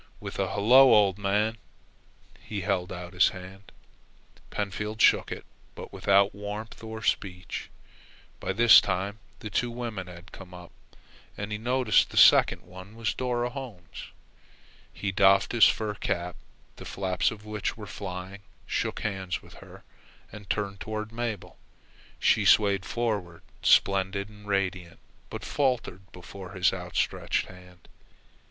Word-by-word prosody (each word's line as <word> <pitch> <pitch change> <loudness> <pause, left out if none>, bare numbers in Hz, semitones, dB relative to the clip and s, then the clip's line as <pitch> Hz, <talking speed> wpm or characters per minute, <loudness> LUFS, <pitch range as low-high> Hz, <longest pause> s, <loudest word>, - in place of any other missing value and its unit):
With - - -7
a - - 0
"Hello, 125 +6 +7
old 100 -2 +3
man," 105 +3 0 0.8
he 100 -2 -6
held 90 -1 -1
out 90 -1 -7
his 90 +1 +4
hand. 95 +1 -11 0.8
Pentfield 105 +2 -4
shook - - +4
it, - - -6 0.3
but - - -10
without 100 0 +3
warmth 105 +3 -7
or 110 0 -7
speech. 90 -2 -2 0.7
By - - -3
this 115 +3 +8
time 100 +3 -3 0.2
the 105 - -7
two 120 +5 0
women 115 -6 -5
had 90 0 -12
come 90 -2 -12
up, 90 -1 -12 0.7
and 100 +1 -5
he 105 - -3
noticed 125 0 +2
that - - -14
the - - -6
second - - +6
one 95 +4 -12
was 115 -1 -2
Dora 125 -1 -2
Holmes. 120 -11 -9 0.8
He 100 - -3
doffed 95 +1 +4
his 120 -2 +6
fur 110 -1 -1
cap, 90 -3 -3 0.4
the - - -9
flaps 95 -2 0
of 105 -1 -10
which 105 0 -3
were 105 - -8
flying, 95 0 -7 0.2
shook - - -2
hands 95 -3 -3
with - - -16
her, - - -14 0.5
and 105 -2 -12
turned 100 -2 -2
toward 110 0 -5
Mabel. 115 -4 -5 0.6
She - - +3
swayed 100 -2 +4
forward, 105 -8 -3 0.2
splendid 100 +1 +2
and 105 -1 -15
radiant, 95 -4 -2 0.3
but - - -7
faltered 120 -9 -2
before 95 +1 -10
his 95 -2 +2
outstretched - - -2
hand. 90 -1 -16
100 Hz, 145 wpm, -27 LUFS, 95-110 Hz, 0.8 s, this